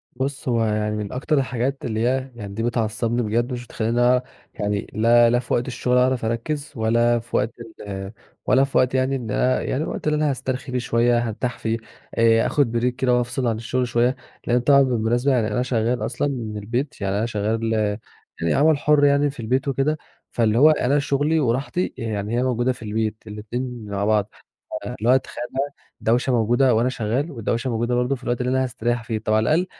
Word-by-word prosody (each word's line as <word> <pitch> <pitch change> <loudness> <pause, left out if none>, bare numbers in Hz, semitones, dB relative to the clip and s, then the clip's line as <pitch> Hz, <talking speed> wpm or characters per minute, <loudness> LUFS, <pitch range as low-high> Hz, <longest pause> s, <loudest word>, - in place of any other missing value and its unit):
بُص، 135 +1 -3
هو 115 -2 +2
يعني 105 0 0
من 105 -2 -4
أكتر 140 +3 0
الحاجات 135 +1 -1
اللي 110 -1 -2
هي 130 +2 0
يعني 100 -3 -7
دي 115 +2 -3
بتعصّبني 115 0 0
بجد، 120 +4 0
مش 120 0 -5
بتخلّيني 120 +3 +2 0.3
يعني 105 0 -2
لا 115 +2 +5
لا 120 +1 +3
في 125 - -4
وقت 120 +2 0
الشغل 125 0 0
أعرف 125 -2 +2
أركّز، 140 +7 -3
ولا 120 +1 +2
في 120 +1 -7
وقت 110 - +1 0.4
ال 95 0 -5 0.3
ولا 130 +1 +4
في 135 - 0
وقت 130 0 +3
يعني 130 +1 +1
إن 115 -5 -4
أنا 130 +4 +2
يعني 140 +4 -1
الوقت - - -4
اللي 150 - +2
أنا 150 -1 +1
هاسترخي 130 -1 -3
فيه 125 - 0
شوية، 120 0 +2
هارتاح 120 +1 -3
فيه، 115 0 -1 0.4
آآ 115 0 +4
آخد 120 -5 +1
Break - - +3
كده 130 -1 +1
وأفْصل 125 +1 -1
عن 115 - +1
الشغل 125 +3 -1
شوية، 120 +2 +2 0.3
لأنه 120 +1 +3
طبعًا 140 +2 +5
بالمناسبة 120 +1 +1
يعني 115 -4 +2
أنا 110 +3 -1
شغال 120 0 0
أصلًا 135 +3 -1
من 115 -6 -4
البيت، 120 +5 -3
يعني 100 0 0
أنا 110 - 0
شغال 110 +1 -1 0.7
يعني 85 - +1
عمل 150 +1 +4
حُر، 145 0 +3
يعني 140 0 +3
في 135 - -11
البيت 130 +5 0
وكده، 140 +3 +1 0.3
فاللي 115 -1 +1
هو 150 +4 +7
أنا 145 -1 +2
شغلي 145 +3 +1
وراحتي 135 +7 -1
يعني 110 -1 -2
هي 125 - +2
موجودة 125 0 +1
في 125 - -15
البيت، 110 0 -1
الإتنين 115 +2 -5
مع 100 0 -2
بعض، 105 -1 +2 0.3
ف - - -8
اللي 115 +4 -3
هو 130 - +7
تخيّل 120 -2 -4
بقى، 140 +2 -2 0.3
دوشة 125 +3 +1
موجودة 120 +2 +3
وأنا 120 +3 +2
شغال، 125 +6 -1
ودوشة 120 0 -2
موجودة 120 +2 0
برضه 125 +2 +1
في 125 - -14
الوقت 120 0 -1
اللي 125 +1 0
أنا 130 0 +2
هاستريّح 120 -1 -2
فيه. 115 -2 -2
طَب 110 0 -2
على 110 0 +3
الأقل 165 +9 +2
120 Hz, 205 wpm, -22 LUFS, 115-130 Hz, 0.7 s, هو